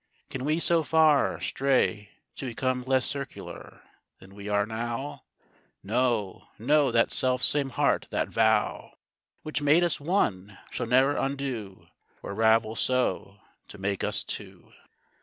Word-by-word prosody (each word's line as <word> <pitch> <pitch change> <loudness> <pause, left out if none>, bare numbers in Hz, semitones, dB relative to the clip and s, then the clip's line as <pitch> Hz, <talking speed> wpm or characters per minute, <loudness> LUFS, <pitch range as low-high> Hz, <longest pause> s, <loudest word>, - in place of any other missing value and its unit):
Can 130 0 -4
we 155 +2 +1
so 170 0 +3
far 155 0 +3
Stray, 125 -6 0 0.3
to 135 - -5
become 130 +1 -1
less 130 -1 +2
circular 140 -2 -7 0.3
Than 95 +1 -16
we 100 +1 -8
are 100 0 +2
now? 120 +5 -5 0.6
No, 115 -2 -1
no, 145 +5 +3
that 115 - +2
self 125 -1 +1
same 145 -2 +2
heart, 120 - +1
that - - -1
vow - - +1 0.5
Which 155 -1 -3
made 150 +4 +4
us 170 -2 0
one, 105 - -1
shall 120 - -3
ne'er 130 +4 +4
undo, 130 -8 -4 0.4
Or - - -5
ravel 110 +1 +3
so, 110 -6 -1 0.3
to - - -12
make 95 0 -2
us - - 0
two. - - -8
125 Hz, 140 wpm, -27 LUFS, 105-140 Hz, 0.6 s, made